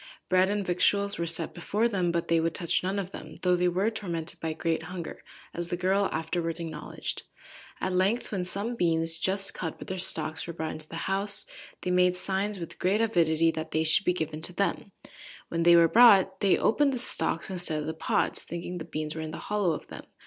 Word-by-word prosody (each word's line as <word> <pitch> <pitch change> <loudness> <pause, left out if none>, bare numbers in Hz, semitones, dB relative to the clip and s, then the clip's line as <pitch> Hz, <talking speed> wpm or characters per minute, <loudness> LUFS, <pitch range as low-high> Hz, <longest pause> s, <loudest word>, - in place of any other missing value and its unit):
Bread 185 +1 +4
and 205 -1 -1
victuals 200 +2 +2
were 170 - -1
set 165 0 -4
before 205 +6 0
them, 185 -6 0
but 170 0 -1
they 165 0 +3
would 165 0 0
touch 170 - +1
none 190 +2 -2
of 195 -2 -3
them, - - -9
though 180 -1 +4
they 180 0 +2
were 190 +5 +1
tormented 175 -6 -4
by 160 - -2
great 165 +1 -1
hunger, 175 -3 -7 0.3
as 175 0 -4
the 175 - -2
girl 190 +2 +2
afterwards 165 +1 -2
acknowledged. 165 -2 -5 0.6
At 185 - -1
length 195 +6 +1
when 190 -4 -1
some 200 +6 -2
beans, 165 -4 0
just 195 +2 0
cut, 165 -3 -4
with - - -9
their 190 0 -3
stalks, 160 -3 -2
were 170 - -5
brought 160 -1 -3
into 155 0 -7
the - - -7
house, 195 +1 0 0.4
they 180 - -1
made 180 0 +4
signs, 195 +2 -1
with 170 -2 -8
great 195 +4 +2
avidity, 165 -7 +3
that 160 0 -5
they 155 - +1
should 160 +5 +3
be - - +4
given 160 -3 -3
to 180 - -1
them. 200 +1 -1 0.6
When 165 - -1
they 170 +1 +7
were 170 -1 +7
brought 195 -3 +6
they 195 -2 +4
opened 280 +5 +3
the - - -1
stalks 195 -7 -1
instead 175 -4 -1
of 150 - -4
the 160 - -2
pods, 160 - 0
thinking 175 +1 -5
the 160 - -6
beans 155 0 -4
were 160 - -5
in 160 - -4
the 160 - -6
hollow 205 -4 0
of - - -6
them. - - -9
180 Hz, 220 wpm, -28 LUFS, 165-195 Hz, 0.6 s, they